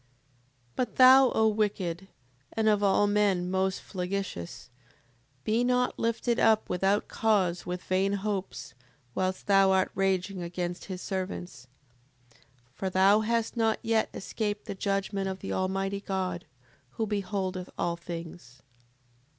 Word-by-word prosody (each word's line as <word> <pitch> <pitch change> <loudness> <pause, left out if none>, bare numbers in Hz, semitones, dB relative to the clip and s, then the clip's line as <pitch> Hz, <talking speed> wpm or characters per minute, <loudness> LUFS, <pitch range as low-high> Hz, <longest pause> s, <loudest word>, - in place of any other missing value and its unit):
7:34. 125 - -37 0.7
But 250 - -1
thou, 260 0 +8
O 220 0 +4
wicked, 195 -4 -1 0.5
and 220 -1 0
of 210 -1 +3
all 200 0 +3
men 200 -3 +1
most 190 0 0
flagitious, 180 - -5 0.7
be 225 +3 +1
not 250 0 +1
lifted 230 +1 0
up 220 -1 +4
without 195 +3 +1
cause 190 -6 +1
with 180 0 -4
vain 190 +2 +1
hopes, 190 - -4 0.4
whilst 185 0 -2
thou 195 -1 +5
art 190 -1 +2
raging 190 0 0
against 175 +1 -4
his 185 -2 -6
servants. 180 -9 -5 0.6
7:35. - - -26 0.3
For 190 +6 -3
thou 195 +3 +5
hast 230 +1 -1
not 225 -2 +2
yet 225 -1 +1
escaped 210 +1 -4
the - - -4
judgment 195 0 -1
of 190 - -4
the 195 - -5
Almighty 195 +1 -1
God, 185 -3 -3 0.5
who 225 - -1
beholdeth 195 -3 -3
all 170 - 0
things. 165 -6 -9
195 Hz, 135 wpm, -28 LUFS, 180-210 Hz, 0.7 s, thou